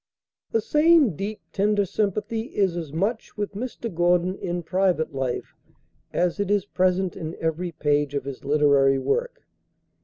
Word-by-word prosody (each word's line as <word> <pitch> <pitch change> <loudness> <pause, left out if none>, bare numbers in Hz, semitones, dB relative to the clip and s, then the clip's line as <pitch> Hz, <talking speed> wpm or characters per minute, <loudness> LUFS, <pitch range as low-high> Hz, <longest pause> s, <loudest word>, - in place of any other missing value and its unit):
The 225 - +2
same 300 - +4
deep, 205 +5 -5
tender 205 0 +2
sympathy 215 +4 -2
is 190 -4 +2
as 165 -4 -5
much 205 +11 -2
with 205 -1 -2
Mr. 230 0 -5
Gordon 175 +2 +2
in 175 0 -3
private 180 -3 +1
life 130 -2 -3 0.6
as 180 +2 0
it 200 -1 -1
is 205 -1 +2
present 185 -1 +1
in 160 -3 -6
every 165 +2 -2
page 145 -2 0
of 140 -2 -2
his 140 -2 -7
literary 140 -2 +4
work. - - -2
180 Hz, 150 wpm, -24 LUFS, 155-210 Hz, 0.6 s, same